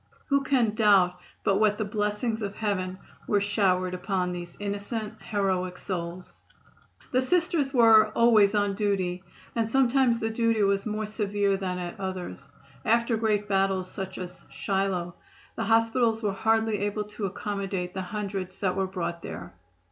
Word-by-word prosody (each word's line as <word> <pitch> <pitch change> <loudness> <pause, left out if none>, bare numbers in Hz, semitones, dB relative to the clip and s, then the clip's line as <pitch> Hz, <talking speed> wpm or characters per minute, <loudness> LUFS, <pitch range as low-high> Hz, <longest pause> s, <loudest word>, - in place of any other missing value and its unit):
Who 280 -1 +3
can 255 -6 +2
doubt 195 -5 +4 0.2
but 195 - +3
what 210 -1 +3
the 215 - -1
blessings 210 +2 -1
of 200 -1 -4
heaven 185 -4 -2 0.3
were 205 - +3
showered 190 -3 +1
upon 180 -1 -1
these 175 -1 -7
innocent, 205 +2 -4
heroic 185 -3 -1
souls? 175 -1 -6 0.7
The 255 - +3
Sisters 330 -1 +1
were 225 -4 +7
"always 220 -3 +5
on 205 -1 +2
duty," 190 -3 -1 0.3
and 225 -1 0
sometimes 260 -1 +3
the 225 -1 -2
duty 230 -1 +2
was 195 +1 +1
more 215 0 -2
severe 205 -2 0
than 185 -2 -3
at 180 +3 -6
others. 185 - -5 0.3
After 235 +1 +2
great 215 -2 0
battles, 195 -2 +1
such 190 -1 -6
as 180 0 -7
Shiloh, 190 -3 -1 0.4
the - - -2
hospitals 225 0 +2
were 205 -2 +1
hardly 220 0 +1
able 205 +1 -1
to 210 -1 -4
accommodate 195 -2 -3
the 190 - -3
hundreds 195 -1 -4
that 185 -2 0
were 190 0 0
brought 175 -2 -4
there. 85 0 -8
205 Hz, 155 wpm, -27 LUFS, 185-220 Hz, 0.7 s, were